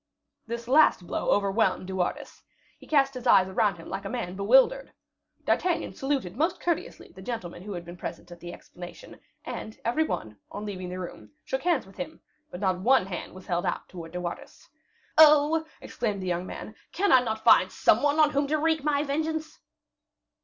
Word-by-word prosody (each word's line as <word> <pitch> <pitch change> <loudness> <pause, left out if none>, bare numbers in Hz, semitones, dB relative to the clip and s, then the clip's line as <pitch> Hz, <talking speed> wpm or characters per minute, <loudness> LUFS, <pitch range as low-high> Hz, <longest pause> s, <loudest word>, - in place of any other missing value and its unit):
This 235 0 -5
last 270 - +5
blow - - -2
overwhelmed 200 -2 +2
De 190 - -6
Wardes. 180 -1 -3 0.4
He - - -15
cast 275 -3 +3
his 255 -2 -5
eyes 190 -1 +6
around 195 +1 +1
him 165 - -11
like 195 - -5
a 195 - -5
man 225 -7 -4
bewildered. 265 - +3 0.5
D'Artagnan 355 -2 0
saluted 270 -9 -2
most 325 +7 0
courteously 340 -2 -3
the 190 - -13
gentlemen 185 -6 -5
who 205 +2 -6
had 175 -1 -6
been 175 +1 -10
present 170 0 -7
at 175 - -11
the 175 +1 -8
explanation; 175 0 -11 0.3
and 220 - -6
every 245 +7 +2
one, 110 - -4
on 205 +1 -6
leaving 185 -3 -5
the 180 - -5
room, 180 -2 -8 0.2
shook 265 - -2
hands 340 -6 +1
with 195 0 -17
him; 180 - -6 0.3
but 175 - -8
not 190 -2 0
one 245 +1 +4
hand 185 -3 -6
was 185 - -11
held 175 -1 -1
out - - -2
towards 165 -2 -9
De 180 - -3
Wardes. 175 -1 -7 0.5
"Oh!" 310 +1 +6
exclaimed 205 -5 -3
the - - -4
young 180 +1 -1
man, 215 - -8 0.2
"can 400 +3 +1
I 255 - +7
not 220 -2 -3
find - - +6
some - - +3
one 290 +1 +2
on 305 -1 +5
whom 280 0 +1
to 310 +2 +1
wreak 315 -1 +1
my 290 -1 +1
vengeance?" 315 +2 -3
220 Hz, 195 wpm, -27 LUFS, 185-290 Hz, 0.5 s, I